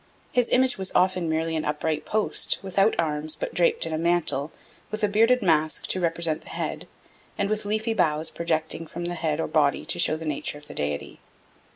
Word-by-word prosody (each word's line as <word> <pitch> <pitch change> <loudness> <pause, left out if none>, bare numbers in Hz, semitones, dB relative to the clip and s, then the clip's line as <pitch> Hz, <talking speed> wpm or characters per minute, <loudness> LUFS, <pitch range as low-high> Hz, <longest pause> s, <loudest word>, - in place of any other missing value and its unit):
His 245 -1 +2
image 255 -4 +3
was 190 -1 0
often 185 -2 +2
merely 160 +1 -1
an 155 - -1
upright 150 +1 -2
post, 215 0 +1
without 195 +3 +2
arms, 155 -1 -1
but - - -5
draped 170 -1 +2
in 165 - -4
a 155 - -1
mantle, 165 -4 +1 0.4
with 215 +1 -5
a - - +5
bearded 225 +4 +3
mask 155 -3 +2
to 185 - +2
represent 165 -2 +1
the - - -14
head, - - -4 0.5
and 200 - 0
with 215 -1 0
leafy 215 +2 0
boughs 155 -5 +1
projecting 160 -1 -2
from 170 +2 -6
the 175 - -2
head 160 -3 -1
or - - -1
body 145 -3 +1
to - - -1
show 155 - +3
the 160 +1 -7
nature 150 -1 -2
of 145 - -13
the - - -9
deity. 75 0 -4
165 Hz, 205 wpm, -25 LUFS, 155-195 Hz, 0.5 s, a